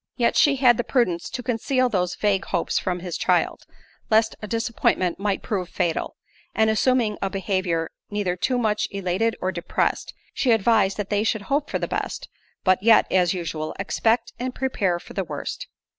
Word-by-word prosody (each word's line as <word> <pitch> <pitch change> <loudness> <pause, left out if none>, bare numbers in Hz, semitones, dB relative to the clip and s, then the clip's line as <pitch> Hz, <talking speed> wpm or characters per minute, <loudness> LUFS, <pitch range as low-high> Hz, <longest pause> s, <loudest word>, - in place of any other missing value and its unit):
Yet 235 -2 +1
she 285 -2 +5
had 250 -3 +5
the 240 - 0
prudence 185 -12 0
to 250 - -5
conceal 255 +2 +1
those 180 -6 -1
vague 200 -2 +1
hopes 175 -3 0
from 180 -1 -2
his 180 -2 -5
child, - - +1 0.4
lest 220 0 +3
a 210 - -5
disappointment 225 -6 0
might 200 -1 -1
prove 185 -4 -2
fatal; 175 -3 -2 0.4
and 220 0 +3
assuming 225 -1 +1
a 195 - 0
behaviour 185 -4 -1 0.2
neither 205 -4 -1
too 250 +8 0
much 215 -3 0
elated 195 +3 -1
or 185 - 0
depressed, 170 -2 -2 0.2
she 265 - 0
advised 210 -3 +3
that 205 -1 -4
they 205 0 +2
should 220 -1 0
hope 285 +6 -1
for - - -1
the - - -3
best, - - -4 0.3
but 185 -1 +3
yet, 225 +1 +6
as 180 -1 +3
usual, 155 -3 -4
expect 225 +4 0
and 255 +1 -3
prepare 205 -9 0
for - - -13
the 195 - -1
worst. - - -6
205 Hz, 180 wpm, -24 LUFS, 185-230 Hz, 0.4 s, yet